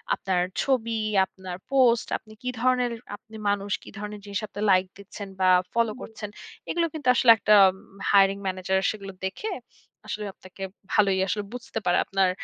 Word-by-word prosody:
আপনার 185 -2 0 0.2
ছবি, 230 -4 0 0.3
আপনার 185 -1 -8
পোস্ট, 250 -4 +4
আপনি 215 - -17
কি 250 - -3
ধরনের 250 -1 +2 0.2
আপনি 220 +1 -16
মানুষ, 200 0 -1
কি - - -11
ধরনের 210 0 -6
জিনিসে 205 +1 -3
আপনি 205 - -7
লাইক 185 0 +4
দিচ্ছেন 200 0 -9
বা 185 - +5 0.2
ফলো 230 -2 +2
করছেন, 215 -2 -7 0.4
এগুলো 335 -1 +1
কিন্তু 290 -5 -6
আসলে 240 -2 +7
একটা 210 +1 +4 0.6
hiring 195 0 +5
manager 185 0 0
সেগুলো 200 -2 -8
দেখে 305 - -4 0.6
আসলে 210 0 -4
আপনাকে 185 +1 -11 0.3
ভালোই 195 -3 +3
আসলে 205 +2 -1
বুঝতে 250 -2 -5
পারে 175 - +3
আপনার 195 -1 +2
210 Hz, 160 wpm, -26 LUFS, 195-235 Hz, 0.6 s, আসলে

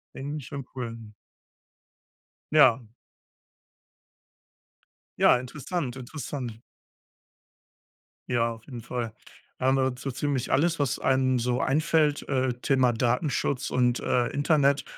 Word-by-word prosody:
Ja. - - -7
Irgendwie 145 +2 -4
schon 140 +1 -7
cool. 120 -3 -4 1.6
Ja. 130 -6 +5 2.3
Ja, - - +6
interessant, 135 +1 -4
interessant. 130 -1 -5 1.8
Ja, 115 -2 +1
auf 115 0 -16
jeden 125 -4 -8
Fall. 120 -1 -4 0.5
Da 130 - -1
haben 130 +1 +4
wir 130 -1 +1
so 135 +2 -4
ziemlich 130 0 -2
alles, 165 +4 +2
was 140 -3 0
einem 130 -1 +2
so 125 +1 0
einfällt, 150 +1 +1
äh, 130 -2 +1
Thema 125 0 +2
Datenschutz 125 +3 0
und, 125 -1 +2
äh, 120 -1 +1
Internet 145 -1 +2
130 Hz, 110 wpm, -27 LUFS, 125-145 Hz, 2.3 s, Ja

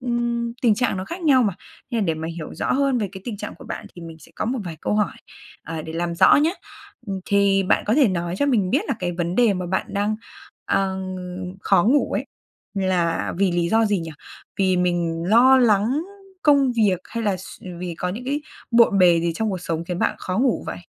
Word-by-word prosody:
ừm, 240 -1 -1
tình 225 -4 +5
trạng 245 -3 0
nó 185 - -4
khác 340 - -7
nhau 270 -6 +5
mà. 200 -5 0 0.4
Nên 235 - 0
là - - +1
để 165 - +1
mà 160 +1 -5
hiểu 155 -3 -7
rõ - - -1
hơn 275 -2 +2
về 205 - -1
cái 190 - -8
tình 230 -4 -4
trạng 210 +1 -7
của - - -14
bạn - - -6
thì 175 - -10
mình 165 -1 -9
sẽ - - -18
có - - -3
một 250 +4 -1
vài 165 -2 -6
câu - - -1
hỏi, 210 -1 0 0.5
à, 160 0 -5
để 160 - -7
làm 170 +1 -2
rõ - - +6
nhá. 300 +3 +3 0.7
Thì 200 -1 +3
bạn 185 - +1
có 215 - +2
thể 275 -7 +5
nói 175 -1 -2
cho 285 - +2
mình 215 -9 +2
biết - - +3
là - - +1
cái 175 -1 -2
vấn 175 0 -2
đề 230 -2 +4
mà 180 -1 -3
bạn 190 +2 -1
đang, 205 +1 -1 0.5
ờ, 190 -1 0 0.6
khó 175 - +3
ngủ 275 +7 +2
ấy - - -2 0.5
là 180 -4 0
vì 195 -3 +2
lý 175 -1 +1
do 225 +4 +3
gì 205 -2 +1
nhỉ? 165 -1 -6 0.5
Vì 185 -1 +2
mình 175 -2 0
lo 250 +5 +6
lắng 235 +5 +3 0.4
công 280 -4 +4
việc 210 -6 +2
hay 230 -1 -5
là 200 -3 +1
s 185 - -11 0.2
vì 175 -2 -4
có 180 - -2
những 220 +7 -5
cái 285 +3 -1 0.3
bộn 230 -4 +5
bề 175 -3 +5
gì 170 0 0
trong 220 +3 -1
cuộc 185 - -3
sống 165 -1 -3
khiến 175 0 -4
bạn - - +1
khó 185 +3 -3
ngủ 255 -1 +1
vậy? - - -5
195 Hz, 235 wpm, -22 LUFS, 175-235 Hz, 0.7 s, rõ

